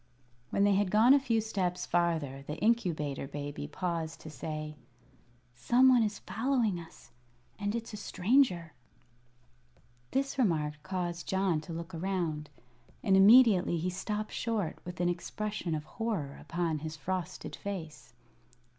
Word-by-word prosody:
When 200 - +1
they 205 0 +5
had 200 0 +2
gone 220 +6 +6
a 285 - +6
few 235 -4 +1
steps 190 -5 -2
farther 160 -6 0
the 150 - -4
Incubator 170 - 0
Baby 145 - -5
paused 165 - -3
to 155 - -9
say: 155 +2 -5 0.8
"Some 245 - +4
one 250 -2 +6
is 210 -2 0
following 230 -5 0
us, 165 -1 -14 0.5
and 205 +1 -1
it's 230 -1 -5
a - - -5
stranger." 185 - +2 1.4
This 275 +1 -1
remark 150 - +1
caused 175 -2 -4
John 190 -5 +1
to 165 +2 -8
look 170 +2 -6
around, 165 -4 -2 0.5
and 195 -4 +4
immediately 200 -3 +7
he 180 +3 -1
stopped 210 +3 -3
short 220 -7 -2
with 180 -1 -7
an 175 - +2
expression 175 0 -3
of 150 - -4
horror 175 -7 -3
upon 170 -2 -1
his 155 +1 -6
frosted 185 +3 -4
face. 165 -7 -7
180 Hz, 140 wpm, -31 LUFS, 160-215 Hz, 1.4 s, immediately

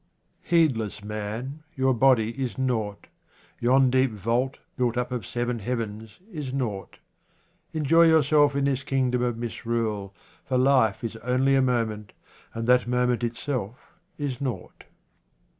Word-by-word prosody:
Heedless 125 - +1
man, 110 +7 -5
your 130 -1 +2
body 115 -2 +3
is 130 0 -4
nought. 115 -6 -2 0.5
Yon 130 +2 +4
deep 130 +1 +3
vault 115 +5 -1 0.2
built 125 -2 0
up 125 0 -1
of 125 -2 -4
seven 120 -1 -2
heavens 110 -1 -4
is 150 -7 -5
nought. 115 -8 -4 0.7
Enjoy 165 +2 +4
yourself 150 -2 +4
in 140 - +1
this 140 -1 0
kingdom 130 -3 0
of 120 -2 -1
misrule, 115 -4 -3 0.3
for 130 - -1
life 130 -3 +3
is 115 -1 -4
only 130 +3 +1
a 135 - +4
moment, 115 -5 -1 0.4
and 115 0 -3
that 125 0 +4
moment 125 0 +1
itself 120 -1 -4 0.3
is 140 -4 -4
nought. 130 -4 -5
125 Hz, 135 wpm, -26 LUFS, 115-135 Hz, 0.7 s, Yon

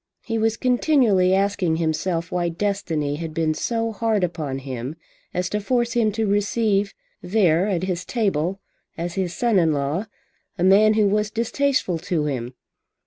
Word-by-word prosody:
He 225 -1 -1
was 225 0 +1
continually 245 -7 +3
asking 195 -4 +1
himself 165 +1 -1
why 175 -1 0
Destiny 165 -6 -2
had 160 -1 -6
been 160 -1 +1
so 230 +6 -1
hard 220 -2 0
upon 155 -6 -2
him 130 +1 -5 0.4
as 180 0 -1
to 210 - -1
force 235 +2 0
him 225 -3 +2
to 220 +1 0
receive 205 0 +1 0.3
there 180 -2 +2
at 185 -4 -1
his 180 -1 -2
table 195 -5 -1 0.4
as 170 +1 -3
his 180 -2 -2
son 235 -5 +2
in 165 -3 +3
law 145 +9 -2 0.5
a 175 - -1
man 210 +3 +5
who 215 -1 +3
was 210 +1 +1
distasteful 230 - 0
to 160 -2 -1
him. 125 -3 -3
190 Hz, 160 wpm, -23 LUFS, 165-215 Hz, 0.5 s, man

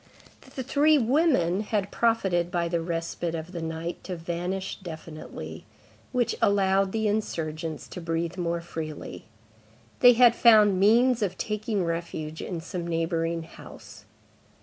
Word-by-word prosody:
The 260 - -3
three 295 +4 +4
women 245 - +2
had 210 -2 -2
profited 190 -7 +1
by 170 -1 -1
the 170 0 -1
respite 165 0 -3
of 165 +2 -6
the 170 -3 -5
night 160 +1 -5
to 185 - -4
vanish 175 +3 -4
definitely; 160 -3 -8 0.5
which 245 -3 +1
allowed 195 -1 +3
the 220 0 0
insurgents 160 -7 -3
to 180 - -7
breathe 165 0 -2
more 170 -2 -2
freely. 160 -3 -7 0.7
They 245 -1 +8
had 240 0 +6
found 210 -5 +6
means 235 +4 +4
of 190 -3 -1
taking 210 -2 -2
refuge 165 -2 -4
in 175 -4 -5
some 175 0 -5
neighboring 165 0 -1
house. 160 - -13
180 Hz, 135 wpm, -26 LUFS, 165-215 Hz, 0.7 s, They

